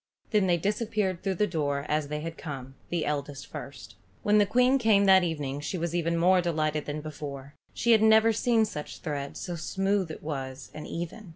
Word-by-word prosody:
Then 210 -4 +3
they 175 -1 +3
disappeared 205 -1 -1
through 195 -1 -1
the 210 - +2
door 145 -6 -1
as 150 -1 0
they 150 +1 -4
had 165 +1 -5
come, 135 -5 -7 0.2
the 170 -2 -1
eldest 140 -2 -3
first. 140 +3 -9 0.3
When 210 0 +4
the 205 - +4
Queen 250 +5 +4
came 215 -4 +4
that 190 -1 +7
evening 145 -5 -2
she 150 +6 -3
was 170 0 -2
even 170 -1 0
more 180 +2 +4
delighted 155 -3 -1
than 150 +1 -3
before. 145 -2 -7 0.3
Never 220 -1 +6
had 225 - +1
she - - -2
seen 230 -3 +3
such 150 -8 -6
thread, 140 -2 -4
so 175 - -4
smooth 195 +2 0
it 155 - -8
was 135 -3 -5
and 155 - -7
even. 175 +4 -6
170 Hz, 200 wpm, -28 LUFS, 150-200 Hz, 0.3 s, that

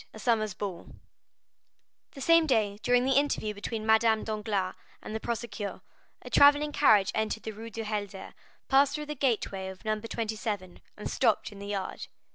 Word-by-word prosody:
A - - -8
Summer 220 -1 +1
Ball 195 -4 -6 1.2
The 275 - -10
same 330 +2 +5
day 210 -6 +1
during 245 +2 +3
the 265 0 +3
interview 280 -7 -1
between 215 +2 -5
Madame 220 0 +4
Danglars 210 -3 -2 0.3
and - - -8
the 220 - -2
procureur, 220 -5 -4 0.4
a - - -8
travelling 290 +1 +6
carriage 210 -9 +4
entered 220 0 -2
the 220 - -4
Rue 225 +2 -9
du 225 0 -5
Helder, 205 -2 -5 0.3
passed 280 +1 +4
through 300 0 -4
the 300 - -4
gateway 225 -8 -1
of 190 +2 -10
No. 215 0 0
27, 215 -4 -4 0.2
and 210 - -5
stopped 230 -5 +1
in 200 - -12
the 200 - -7
yard. 200 -2 -4
220 Hz, 170 wpm, -29 LUFS, 205-245 Hz, 1.2 s, travelling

